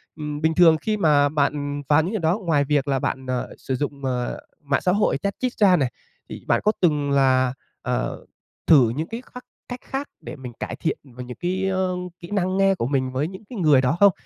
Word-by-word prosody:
Ừm, 150 Hz, -1 st, -5 dB
bình 160 Hz, 0 st, +2 dB
thường 165 Hz, -3 st, +6 dB
khi 215 Hz, +3 st, -1 dB
mà 145 Hz, -5 st, +4 dB
bạn 145 Hz, -1 st, -1 dB
và 150 Hz, +2 st, +5 dB
những 180 Hz, +6 st, -3 dB
người 215 Hz, -, -1 dB
đó 165 Hz, +4 st, +1 dB
ngoài 160 Hz, -7 st, +1 dB
việc 145 Hz, -1 st, 0 dB
là 135 Hz, -1 st, +1 dB
bạn, 130 Hz, +1 st, -3 dB
ờ, 125 Hz, -1 st, -2 dB
sử 130 Hz, -, -3 dB
dụng, 140 Hz, 0 st, -4 dB
ờ, 125 Hz, -1 st, -2 dB, 0.2 s
mạng 140 Hz, -1 st, 0 dB
xã 180 Hz, -, +2 dB
hội 205 Hz, +3 st, +2 dB
chat 200 Hz, 0 st, -3 dB
chít 255 Hz, -1 st, -1 dB
ra 195 Hz, -4 st, +5 dB
này, 135 Hz, -6 st, 0 dB, 0.4 s
thì -, -, -8 dB
bạn -, -, +2 dB
có 210 Hz, -, +4 dB
từng 150 Hz, -4 st, +2 dB
là, 130 Hz, -2 st, +3 dB, 0.3 s
ờ, -, -, -3 dB, 0.4 s
thử 135 Hz, -8 st, +6 dB
những 155 Hz, +8 st, -3 dB
cái 230 Hz, +2 st, -6 dB
khác 250 Hz, 0 st, -9 dB, 0.3 s
cách 245 Hz, -, -5 dB
khác 275 Hz, +2 st, -4 dB
để -, -, -8 dB
mình 125 Hz, -3 st, -9 dB
cải -, -, -4 dB
thiện 165 Hz, -, -2 dB, 0.2 s
về 125 Hz, -, -5 dB
những 125 Hz, 0 st, -9 dB
cái, 185 Hz, +2 st, -1 dB
ơ, 185 Hz, -1 st, 0 dB, 0.3 s
kỹ 170 Hz, +3 st, -11 dB
năng 190 Hz, -1 st, 0 dB
nghe 195 Hz, 0 st, +4 dB
của 115 Hz, -, -2 dB
mình 130 Hz, -2 st, 0 dB
với 140 Hz, +4 st, -1 dB
những 190 Hz, +3 st, -10 dB
cái 235 Hz, -6 st, -6 dB
người 150 Hz, -6 st, +5 dB
đó 130 Hz, +6 st, +1 dB
không? 200 Hz, -1 st, +7 dB
150 Hz, 235 wpm, -23 LUFS, 135-185 Hz, 0.4 s, không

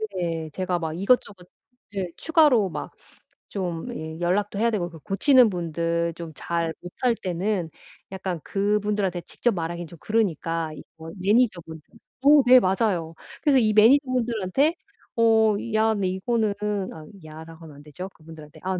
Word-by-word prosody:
네. 165 Hz, -3 st, -3 dB
제가 180 Hz, -2 st, -1 dB
막 160 Hz, -2 st, -3 dB
이것저것 200 Hz, -3 st, 0 dB, 0.5 s
예 190 Hz, -2 st, -2 dB
추가로 295 Hz, -, +3 dB
막 150 Hz, -3 st, -6 dB, 0.6 s
좀 175 Hz, -4 st, -4 dB
예 160 Hz, +1 st, -7 dB
연락도 200 Hz, +4 st, 0 dB
해야 230 Hz, +2 st, +3 dB
되고 180 Hz, -5 st, -2 dB
그 165 Hz, -2 st, -13 dB
고치는 245 Hz, -, +4 dB
분들 170 Hz, -1 st, -1 dB
좀 165 Hz, -2 st, -8 dB
잘 170 Hz, 0 st, -2 dB
못할 230 Hz, +7 st, -1 dB
때는 185 Hz, -2 st, -2 dB, 0.4 s
약간 185 Hz, -3 st, -4 dB
그분들한테 205 Hz, -2 st, -1 dB
직접 240 Hz, +6 st, -1 dB
말하긴 170 Hz, -1 st, -4 dB
좀 170 Hz, -, -13 dB
그러니까 165 Hz, -7 st, -1 dB
이거 160 Hz, +1 st, -12 dB
매니저분들 190 Hz, -7 st, +1 dB, 0.4 s
어 290 Hz, 0 st, +8 dB
네 255 Hz, +1 st, +8 dB
맞아요. 185 Hz, -5 st, 0 dB, 0.3 s
그래서 290 Hz, -3 st, +4 dB
이 220 Hz, -4 st, +3 dB
매니저분들한테 245 Hz, -, +3 dB, 0.4 s
어 225 Hz, -2 st, +4 dB, 0.2 s
"야 220 Hz, 0 st, +3 dB
근데 200 Hz, -3 st, -1 dB
이거는" 210 Hz, +3 st, 0 dB, 0.4 s
아 155 Hz, -1 st, -11 dB, 0.2 s
"야."라고 160 Hz, +1 st, -11 dB
하면 150 Hz, -3 st, -13 dB
안 145 Hz, -, -14 dB
되죠 155 Hz, +6 st, -8 dB
그분들한테. 155 Hz, -3 st, -14 dB
아 185 Hz, 0 st, -1 dB
185 Hz, 305 characters per minute, -24 LUFS, 165-220 Hz, 0.6 s, 어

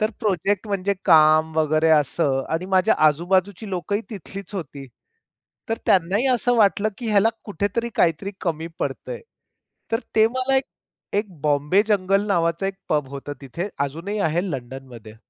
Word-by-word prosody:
तर 215 Hz, +1 st, +1 dB
प्रोजेक्ट 205 Hz, 0 st, 0 dB
म्हणजे 200 Hz, 0 st, 0 dB
काम 155 Hz, 0 st, +5 dB
वगैरे 155 Hz, +1 st, +2 dB
असं 140 Hz, -2 st, +2 dB
आणि 165 Hz, +3 st, -1 dB
माझ्या 190 Hz, +3 st, +4 dB
आजू-बाजूची 185 Hz, +6 st, +1 dB
लोकही 195 Hz, +3 st, -2 dB
तिथलीच 195 Hz, -1 st, -8 dB
होती. 140 Hz, -6 st, -6 dB, 0.8 s
तर 225 Hz, -, -1 dB
त्यांनाही 195 Hz, +7 st, +3 dB
असं 245 Hz, 0 st, +1 dB
वाटलं 210 Hz, 0 st, +3 dB
की 240 Hz, -, -4 dB
ह्याला 210 Hz, +1 st, +4 dB, 0.2 s
कुठेतरी 205 Hz, +4 st, -2 dB
काहीतरी 175 Hz, +4 st, +1 dB
कमी 165 Hz, -2 st, -2 dB
पडतंय. 485 Hz, -1 st, -4 dB, 0.7 s
तर 225 Hz, -, +1 dB, 0.2 s
ते 220 Hz, 0 st, +6 dB
मला 260 Hz, +2 st, 0 dB
एक, 265 Hz, -, +2 dB, 0.5 s
एक 205 Hz, +1 st, 0 dB, 0.2 s
बॉम्बे 150 Hz, +6 st, +3 dB
जंगल 195 Hz, 0 st, +2 dB
नावाचा 170 Hz, -1 st, +1 dB
एक 195 Hz, -, -3 dB
पब 150 Hz, -3 st, 0 dB
होत 140 Hz, +1 st, -7 dB
तिथे 170 Hz, +9 st, -5 dB, 0.2 s
अजूनही 180 Hz, +9 st, -5 dB
आहे 165 Hz, -1 st, +1 dB
लंडनमध्ये. 125 Hz, -4 st, -8 dB
185 Hz, 145 wpm, -23 LUFS, 155-205 Hz, 0.8 s, ते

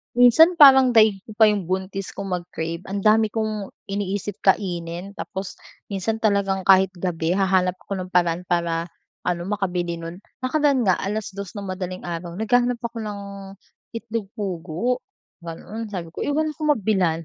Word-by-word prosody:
Minsan 320 Hz, +8 st, +6 dB
parang 265 Hz, -3 st, +8 dB
daig 215 Hz, -4 st, +4 dB
ko 220 Hz, -, -11 dB
pa 215 Hz, +1 st, +5 dB
yung 205 Hz, -3 st, 0 dB
buntis 190 Hz, +2 st, -3 dB
kung 200 Hz, -, -6 dB
mag-crave 170 Hz, -1 st, -5 dB
ang 200 Hz, +1 st, -4 dB
dami 215 Hz, +1 st, +3 dB
kong 215 Hz, -3 st, -3 dB, 0.2 s
iniisip 200 Hz, 0 st, -4 dB
kainin, 180 Hz, 0 st, 0 dB
tapos 190 Hz, -1 st, -6 dB, 0.3 s
minsan 215 Hz, +3 st, -2 dB
talagang 200 Hz, -3 st, +1 dB
kahit 190 Hz, -1 st, +6 dB
gabi 165 Hz, -2 st, -1 dB
hahanap 185 Hz, -1 st, +1 dB
ako 200 Hz, -, -5 dB
ng 185 Hz, -1 st, -6 dB
paraan 175 Hz, 0 st, +2 dB
para 170 Hz, -1 st, 0 dB, 0.4 s
ano, 175 Hz, 0 st, -2 dB
makabili 180 Hz, -4 st, -2 dB
no'n. 165 Hz, +2 st, -8 dB, 0.2 s
Nakaraan 280 Hz, -2 st, +2 dB
nga 185 Hz, -2 st, +2 dB
2:00 200 Hz, -1 st, -5 dB
ng 200 Hz, -, -5 dB
madaling 185 Hz, -1 st, -5 dB
araw 170 Hz, 0 st, -5 dB
naghahanap 245 Hz, +3 st, +2 dB
ako 235 Hz, 0 st, -4 dB
ng 210 Hz, -2 st, -5 dB, 0.8 s
itlog 230 Hz, -3 st, -4 dB
pugo, 190 Hz, +5 st, -2 dB, 0.4 s
gano'n. 210 Hz, +7 st, -7 dB
Sabi 175 Hz, -5 st, -6 dB
ko, -, -, -7 dB
eh, -, -, -2 dB
wala 310 Hz, +2 st, 0 dB
akong 305 Hz, +1 st, -3 dB
mabilhan, 185 Hz, -6 st, 0 dB
195 Hz, 155 wpm, -23 LUFS, 180-220 Hz, 0.8 s, parang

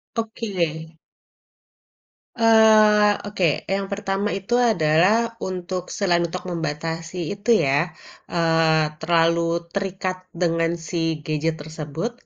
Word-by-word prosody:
Oke. 175 Hz, -8 st, -3 dB, 1.4 s
Eee, 215 Hz, -2 st, +5 dB
oke, 195 Hz, -4 st, 0 dB, 0.3 s
yang 195 Hz, 0 st, -2 dB
pertama 200 Hz, 0 st, -2 dB
itu 195 Hz, +5 st, -5 dB, 0.2 s
adalah 170 Hz, +3 st, +3 dB, 0.3 s
untuk 180 Hz, 0 st, -4 dB
selain 175 Hz, -4 st, +2 dB
untuk 180 Hz, +2 st, -6 dB
membatasi 165 Hz, +1 st, -4 dB
itu 205 Hz, +3 st, -6 dB, 0.2 s
ya, 135 Hz, +1 st, +2 dB, 0.6 s
eee, 160 Hz, -2 st, +2 dB
terlalu 165 Hz, 0 st, +2 dB, 0.3 s
terikat 190 Hz, -1 st, -3 dB, 0.2 s
dengan 165 Hz, -1 st, +1 dB, 0.2 s
si 175 Hz, -, -4 dB, 0.3 s
gadget 155 Hz, +1 st, -1 dB
tersebut, 160 Hz, +7 st, -5 dB
175 Hz, 100 wpm, -22 LUFS, 165-200 Hz, 1.4 s, Eee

